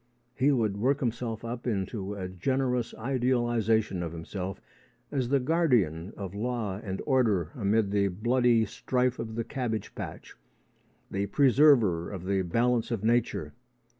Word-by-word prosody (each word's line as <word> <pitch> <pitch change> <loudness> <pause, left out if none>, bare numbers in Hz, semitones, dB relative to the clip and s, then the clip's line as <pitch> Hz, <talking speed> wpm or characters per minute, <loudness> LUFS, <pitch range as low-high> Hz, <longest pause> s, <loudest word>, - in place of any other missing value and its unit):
He 135 +4 +3
would 110 -7 +1
work 135 +7 +1
himself 115 -2 -3
up 120 +1 -5
into 100 -1 -2
a 95 -2 -4
generous 125 +6 -1
idealisation 120 -5 +1
of 85 -1 -4
himself 90 +3 -5 0.5
as 130 -4 -1
the 140 0 +3
guardian 120 - +1
of 95 -2 -6
law 110 -3 -2
and 95 -2 -4
order 110 - +2
amid 105 -2 +1
the 100 -1 +2
bloody 120 +4 +2
strife 125 +3 -1
of 110 -1 -5
the 115 - -1
cabbage 115 -4 -3
patch - - -8 0.8
the 100 +1 -1
preserver 125 - +4
of 95 -3 -7
the 95 0 +1
balance 115 +6 +1
of 115 -4 -2
nature. 120 +1 +1
115 Hz, 140 wpm, -28 LUFS, 100-125 Hz, 0.8 s, preserver